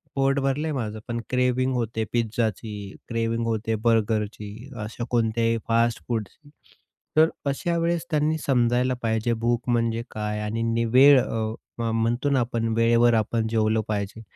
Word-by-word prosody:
पोट 135 0 +2
भरलं 135 +3 0
आहे 155 - -2
माझं 110 -5 -3
पण 120 0 -2
क्रेव्हिंग 125 +1 +1
होते 115 -2 -1
पिझ्झाची, 110 -3 -2
क्रेव्हिंग 115 0 -1
होते 110 0 -1
बर्गरची. 110 -2 +1 0.3
अशा 110 +3 -6
कोणत्याही 115 -1 +1
फास्टफूडची. 115 - -1 0.7
तर 160 +1 +6 0.2
अशावेळेस 170 +3 -1
त्यांनी 155 +1 +1
समजायला 125 -1 +2
पाहिजे, 110 +1 0
भूक 120 +2 -1
म्हणजे 115 -1 +1
काय? 105 0 -3
आणि 115 +2 -1
वेळ 135 +1 +8
अ, 110 -2 -2 0.4
म्हणतो 115 +4 0
ना 140 -2 +3
आपण, 115 -1 -1
वेळेवर 115 +1 +4
आपण 110 0 +1
जेवलं 110 0 +1
पाहिजे. 105 +1 -3
115 Hz, 135 wpm, -25 LUFS, 110-125 Hz, 0.7 s, वेळ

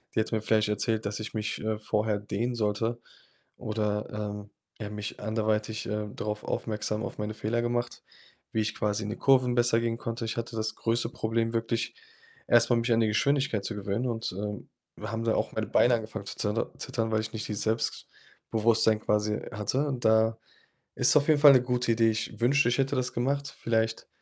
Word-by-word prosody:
Die - - +3
hätte 110 +1 0
mir 110 - 0
vielleicht 110 -1 +2
erzählt, 110 +1 0
dass 100 0 -3
ich 110 +2 -6
mich, 105 -1 -2
äh, 110 -1 0
vorher 105 -1 0
dehnen 115 +4 -2
sollte 115 +2 -1 0.6
oder, 105 -1 -2
ähm, 105 -1 -5 0.3
ja, 105 -2 -5
mich 105 -1 -6
anderweitig, 110 0 -1
äh, 105 0 -2
darauf 105 0 -3
aufmerksam 105 -1 -2
auf - - -5
meine 105 +1 -2
Fehler 115 +2 -1
gemacht, 120 0 -2 0.5
wie 110 - +2
ich 110 0 -1
quasi 105 0 -1
in 105 - -4
die - - -3
Kurven 130 -2 +4
besser 120 -1 +3
gehen 115 0 -1
konnte. 115 0 -4
Ich 110 - -4
hatte 115 0 -4
das 110 0 -1
größte 115 +1 0
Problem 115 0 -1
wirklich, 115 0 -1 0.5
erst 120 0 +5
mal 120 - +5
mich 115 +1 0
an 115 - +4
die 110 - +3
Geschwindigkeit 130 0 +1
zu 110 - -3
gewöhnen 105 +4 -2
und, 115 -5 -3
ähm, 105 0 -5 0.3
haben 115 +1 -4
da 115 - +2
auch - - 0
meine - - -2
Beine 120 - +4
angefangen 110 -2 -5
zu - - -6
zeter 105 +2 -1
zittern, 115 -4 -2
weil 110 0 +2
ich 110 - -5
nicht 110 - -4
dieses 105 -1 -2
Selbstbewusstsein 110 0 0
quasi 105 0 +1
hatte 125 +7 -1
und 130 -3 -3
da 110 0 +4 0.6
ist - - +4
auf 145 - +2
jeden 150 -2 +5
Fall 145 -2 +10
'ne 130 - +6
gute 125 -1 0
Idee. 115 0 +4
Ich 110 +2 -4
wünschte, 140 +3 +4
ich 125 - +1
hätte 135 0 +1
das 125 -1 -1
gemacht. 140 +3 -1
Vielleicht 115 -1 0
110 Hz, 200 wpm, -28 LUFS, 105-120 Hz, 0.6 s, Fall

